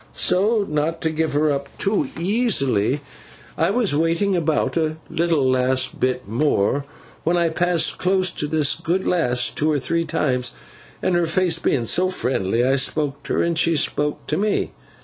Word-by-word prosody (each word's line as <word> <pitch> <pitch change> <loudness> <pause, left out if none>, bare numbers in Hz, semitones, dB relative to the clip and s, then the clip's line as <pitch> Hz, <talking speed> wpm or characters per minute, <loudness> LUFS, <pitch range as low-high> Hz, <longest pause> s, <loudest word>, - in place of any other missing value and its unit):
So 205 +4 +2
not 150 +2 -1
to 160 - 0
give 160 -1 -1
her 150 +1 +2
up 140 0 -3
too 195 -9 0
easily, 150 - +1 0.5
I 165 - +1
was 215 -4 +1
waiting 165 +6 +1
about, 160 -3 0
a 155 -1 0
little 165 -5 +1
last 130 0 +1
bit 130 -2 -1
more, 140 +2 +1 0.4
when 175 +2 +1
I 170 -1 +2
passed 175 0 0
close 185 -1 +2
to 150 - -3
this 150 -2 +2
good 185 +3 -2
lass 125 -9 +1
two 155 - 0
or 150 - +1
three 165 +6 -1
times; 125 -6 -1 0.5
and - - +1
her 175 -1 +2
face 170 0 +1
being 120 -6 0
so 185 +10 +1
friendly 120 - 0
I 135 +1 +2
spoke 140 +1 -1
to - - -2
her, - - +2
and 170 0 0
she 165 0 +2
spoke 150 0 -1
to 155 - -1
me. 210 +1 0
155 Hz, 175 wpm, -21 LUFS, 135-175 Hz, 0.5 s, So